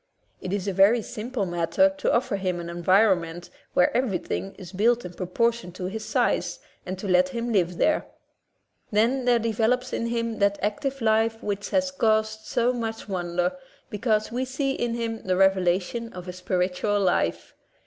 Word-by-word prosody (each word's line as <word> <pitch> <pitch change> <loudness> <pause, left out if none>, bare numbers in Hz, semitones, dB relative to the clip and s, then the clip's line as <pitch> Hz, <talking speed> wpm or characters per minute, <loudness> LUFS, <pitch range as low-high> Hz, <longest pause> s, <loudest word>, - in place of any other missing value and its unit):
It 185 - -5
is 200 -1 -2
a 195 - 0
very 205 +5 +5
simple 225 0 -4
mat 170 -2 -2
ter 285 - +6
to 290 0 -1
offer 235 -4 +1
him 185 -2 -2
an 170 0 -6
environment 175 -1 +2 0.2
where 180 - +3
every 240 -7 +1
thing 195 +2 -5
is 180 -2 -10
built 230 +4 +2
in 180 - -7
proportion 230 +3 -1
to 185 0 -6
his 215 +4 -4
size, - - 0 0.3
and 185 +1 -4
to 195 - -5
let 180 0 +4
him 235 +3 -3
live 180 -3 +1
there. 310 - +2 0.8
Then 235 +5 +2
there 245 -1 +4
develops 230 +3 0
in 235 - -1
him 230 -1 -2
that 200 0 +2
active 265 +6 -2
life 225 0 +2
which 205 -1 -3
has 280 -1 +1
caused 220 -3 0
so 240 +1 +1
much 225 -2 -4
wonder, 180 -1 -1 0.4
because 215 0 0
we 250 +2 -1
see 270 +1 -1
in 240 -3 -2
him 230 -1 -3
the 185 -1 0
reve 195 0 +6
lation 190 +6 -1
of 180 0 -8
a 180 - -5
spiritual 185 +2 0
life. 185 -3 0
210 Hz, 180 wpm, -25 LUFS, 185-235 Hz, 0.8 s, ter